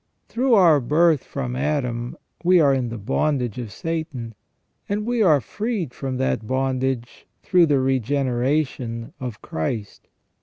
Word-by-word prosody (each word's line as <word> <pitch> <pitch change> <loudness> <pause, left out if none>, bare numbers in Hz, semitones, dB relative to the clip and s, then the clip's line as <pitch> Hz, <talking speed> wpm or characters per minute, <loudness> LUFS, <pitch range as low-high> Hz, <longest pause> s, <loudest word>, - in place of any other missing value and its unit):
Through 250 0 +2
our 170 -7 +6
birth 150 +3 +3
from 125 -3 -4
Adam 125 -4 -2 0.3
we 180 +1 +5
are 140 -4 +5
in 130 -3 -1
the 115 - -5
bondage 125 +2 -1
of 115 -4 -6
Satan, 150 - -4 0.6
and 205 +1 -1
we 240 0 0
are 160 -8 +5
freed 200 - -3
from 130 -2 -4
that 125 -4 -1
bondage 130 -2 -2 0.2
through 180 -2 +4
the 145 -2 +3
regeneration 130 -1 -1
of 125 -5 -6
Christ. 100 +6 -4
135 Hz, 140 wpm, -23 LUFS, 120-160 Hz, 0.6 s, our